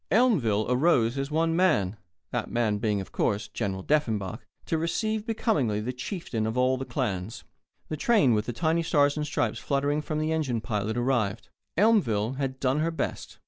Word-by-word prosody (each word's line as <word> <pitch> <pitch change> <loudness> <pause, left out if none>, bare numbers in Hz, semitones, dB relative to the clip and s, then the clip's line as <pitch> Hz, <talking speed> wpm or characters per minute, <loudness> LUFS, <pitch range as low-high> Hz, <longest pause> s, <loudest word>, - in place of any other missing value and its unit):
Elmville 150 - +3
arose 125 -2 +3
as 135 0 -2
one 165 +2 +1
man 110 - +2 0.4
that - - -2
man 110 -3 0
being, 105 -1 0
of 95 - -10
course, 105 0 0
General 100 -3 -3
Deffenbaugh 110 -8 0 0.3
to 165 - 0
receive 215 +6 -1
becomingly 150 - +1
the 120 +4 -3
chieftain 125 - -3
of 110 +3 -3
all 130 +1 +3
the 130 +1 -4
clans. 110 - -3 0.4
The 155 - -4
train 150 - +4
with 105 0 0
the - - -1
tiny 165 +6 +1
Stars 145 -3 +3
and 150 -1 -2
Stripes - - -1
fluttering 145 +1 0
from 150 0 -3
the 155 +1 0
engine 145 -7 0
pilot 110 0 -2
arrived. 120 -6 0 0.3
Elmville 135 - +3
had 135 -2 -3
done 130 +2 +1
her 160 +2 +1
best. 160 -3 -4
130 Hz, 180 wpm, -27 LUFS, 110-160 Hz, 0.4 s, train